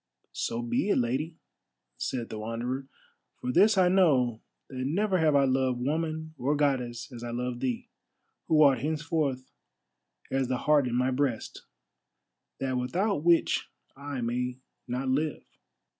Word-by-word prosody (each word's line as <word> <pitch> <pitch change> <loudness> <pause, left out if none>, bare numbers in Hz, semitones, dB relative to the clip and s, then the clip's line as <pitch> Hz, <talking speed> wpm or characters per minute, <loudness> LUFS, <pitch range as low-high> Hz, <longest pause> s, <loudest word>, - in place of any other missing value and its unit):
"So 235 +1 -2
be 240 -1 0
it, - - +3
Lady," 135 +7 -1 0.6
said 120 -3 -3
the 110 - -5
Wanderer, 120 +5 -3 0.5
"for 125 - -2
this 205 +7 +5
I 185 -1 +5
know, 135 -11 +3 0.3
that 130 - -9
never 185 +9 +1
have 155 -2 +3
I 140 - +5
loved 130 -2 +1
woman 160 +3 -2
or 140 +4 +1
Goddess 130 -4 -1
as 120 -1 -8
I 120 - -4
love 120 +1 -3
thee, 125 -3 -2 0.6
who 155 -1 +5
art 135 -4 +5
henceforth 150 -2 -1 0.8
as 135 -1 +1
the 130 0 0
heart 145 -1 +3
in 120 - -2
my 125 +1 +2
breast, 130 -3 -2 0.9
that 130 -1 -1
without 180 - 0
which 170 0 +3 0.3
I 140 -1 -5
may 125 +1 -2 0.3
not 125 +2 -2
live." 145 +4 0
135 Hz, 145 wpm, -28 LUFS, 125-160 Hz, 0.9 s, this